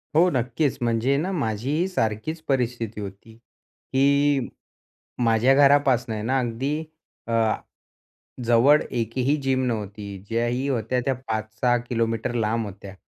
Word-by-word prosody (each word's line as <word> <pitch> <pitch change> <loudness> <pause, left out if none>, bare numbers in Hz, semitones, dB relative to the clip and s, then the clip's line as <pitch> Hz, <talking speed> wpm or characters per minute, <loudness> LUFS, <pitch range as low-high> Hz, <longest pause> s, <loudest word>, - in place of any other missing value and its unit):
हो, 175 +3 +6
नक्कीच. 130 +3 0
म्हणजे 120 +3 +1
ना 180 +6 -1
माझीही 140 - -1
सारखीच 155 - -2
परिस्थिती 120 -5 -1
होती 100 +3 -9
की 140 +2 0 0.7
माझ्या 115 +3 +4
घरापासनं 135 -6 +3
ना 130 +2 +1
अगदी 130 +4 -2 0.5
अ, 115 - -2 1.1
जवळ 120 +6 +5
एकही 125 +4 0
जिम 130 -1 +1
नव्हती. 105 -3 -4
ज्याही 120 +3 0
होत्या 125 0 0
त्या 135 - +2
5-6 110 +3 0
किलोमीटर 115 -1 -2
लांब 115 0 0
होत्या 100 -1 -9
120 Hz, 115 wpm, -24 LUFS, 115-135 Hz, 1.1 s, हो